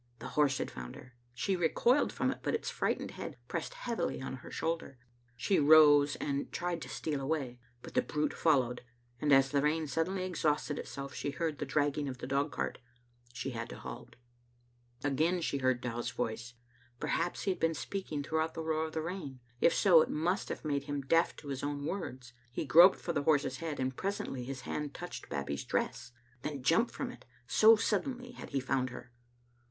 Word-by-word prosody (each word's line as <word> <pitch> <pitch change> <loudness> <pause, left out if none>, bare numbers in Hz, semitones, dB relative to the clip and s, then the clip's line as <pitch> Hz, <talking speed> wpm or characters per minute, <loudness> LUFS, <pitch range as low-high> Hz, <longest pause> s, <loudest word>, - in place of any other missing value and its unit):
The 115 - -7
horse 145 -3 +3
had - - -3
found - - -7
her. 125 0 -13 0.2
She 190 +10 0
recoiled 235 - +3
from - - 0
it, - - -6
but - - 0
its 455 - -3
frightened - - -1
head - - -7
pressed - - -4
heavily 240 - -2
on 130 0 -5
her - - -11
shoulder. 165 -5 -3 0.4
She 185 - +2
rose 145 -1 +7
and 140 -1 -2
tried 175 0 -2
to - - -7
steal 150 -3 -2
away, 135 -4 -2 0.2
but - - -9
the - - +4
brute 150 0 -1
followed, 130 -6 +2 0.4
and 150 - +1
as 135 -1 +6
the 140 - +3
rain 155 +2 +1
suddenly 180 +5 -1
exhausted 150 -4 0
itself 140 0 -6
she - - -3
heard 155 0 -2
the 145 - -3
drag 145 +1 +2
ging 145 0 -2
of 130 - -6
the - - -6
dogcart. 140 +3 -1 0.5
She 125 +2 -4
had 115 -1 -5
to - - -7
halt. - - -9 0.9
Again 155 +6 +2
she 140 -4 -1
heard 130 -2 +2
Dow's 120 0 -3
voice. 120 0 -4 0.4
Perhaps 170 +2 -1
he 195 - +2
had 185 - -4
been 165 0 +2
speaking 160 -4 -4
throughout 160 +2 -1
the 160 - -3
roar 160 0 0
of 155 - -10
the 160 - -2
rain. 165 -7 -5 0.2
If - - +5
so, 175 -6 +6
it - - 0
must 175 +6 0
have - - -5
made 140 -2 0
him 145 -1 -2
deaf 165 +5 +2
to 145 - -10
his 135 -1 -3
own 145 0 -3
words. 130 -9 -5 0.2
He 140 - -3
groped 170 +8 +8
for 170 - -3
the 145 - +1
horse's 145 -3 +2
head, 160 -2 -4
and 130 0 -1
presently 195 - -3
his 135 0 -5
hand 145 +1 -4
touched 175 - -7
Bab 70 -1 -2
bie's 70 0 -3
dress, - - -2 0.3
then 140 -1 -4
jumped 165 - +3
from - - -4
it, - - -14 0.2
so 220 +1 +7
suddenly 245 +4 -1
had 245 - -9
he 140 - 0
found 130 0 0
her. 125 0 -10
145 Hz, 200 wpm, -32 LUFS, 135-165 Hz, 0.9 s, groped